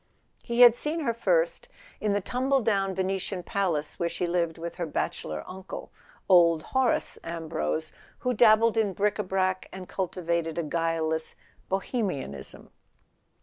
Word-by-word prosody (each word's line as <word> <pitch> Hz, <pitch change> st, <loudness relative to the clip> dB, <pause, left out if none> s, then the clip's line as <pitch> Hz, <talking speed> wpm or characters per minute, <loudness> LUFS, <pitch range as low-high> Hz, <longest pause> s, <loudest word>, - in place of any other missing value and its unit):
He 235 Hz, +1 st, 0 dB
had 240 Hz, -1 st, +10 dB
seen 305 Hz, +6 st, -2 dB
her 235 Hz, -6 st, 0 dB
first -, -, +1 dB, 0.3 s
in 210 Hz, -1 st, 0 dB
the 205 Hz, -, +1 dB
tumble 260 Hz, +6 st, +1 dB
down 195 Hz, -4 st, +1 dB
Venetian 190 Hz, 0 st, -2 dB
palace 170 Hz, -6 st, -1 dB
where 170 Hz, -, +1 dB
she 175 Hz, +1 st, -2 dB
lived 170 Hz, -1 st, 0 dB
with 170 Hz, +1 st, -6 dB
her 170 Hz, -2 st, -2 dB
bachelor 80 Hz, -, -3 dB
uncle, 190 Hz, 0 st, -8 dB, 0.4 s
old 170 Hz, -4 st, +5 dB
Horace 260 Hz, -2 st, 0 dB
Ambrose, 115 Hz, -, -3 dB, 0.2 s
who 250 Hz, -, -1 dB
dabbled 225 Hz, 0 st, +5 dB
in 210 Hz, -3 st, +2 dB
bric 205 Hz, +2 st, 0 dB
a -, -, +1 dB
brac 185 Hz, 0 st, -1 dB
and 185 Hz, -1 st, -8 dB
cul¬ 190 Hz, -2 st, -2 dB
tivated 170 Hz, -2 st, -2 dB
a 170 Hz, -, 0 dB
guileless 160 Hz, 0 st, -1 dB, 0.3 s
Bohemianism. 190 Hz, -, -3 dB
185 Hz, 145 wpm, -27 LUFS, 170-220 Hz, 0.4 s, had